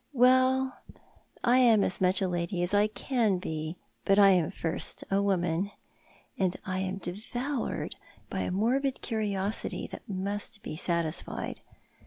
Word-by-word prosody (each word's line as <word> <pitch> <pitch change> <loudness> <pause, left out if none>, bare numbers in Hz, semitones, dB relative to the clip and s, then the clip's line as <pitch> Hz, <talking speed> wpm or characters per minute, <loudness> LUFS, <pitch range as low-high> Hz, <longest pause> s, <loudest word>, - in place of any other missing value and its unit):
Well, 260 +1 +4 0.7
I 250 +1 +5
am 230 -5 +6
as 185 - -1
much 185 +1 +3
a - - +2
lady 175 +1 -1
as 175 - 0
I 205 +1 +5
can 220 -3 0
be, 160 -1 -4 0.3
but 195 - +3
I 200 -1 +8
am 175 -4 +3
first 165 -1 -3
a 195 +1 +3
woman; 185 -1 +1 0.7
and 185 -2 +1
I 185 -1 -2
am 190 0 -2
devoured 240 +9 -3 0.3
by - - -4
a - - -1
morbid 255 +8 +1
curiosity 210 -3 -2
that - - -9
must 205 +3 -4
be - - -5
satisfied. 170 -1 -1
200 Hz, 145 wpm, -29 LUFS, 180-235 Hz, 0.7 s, I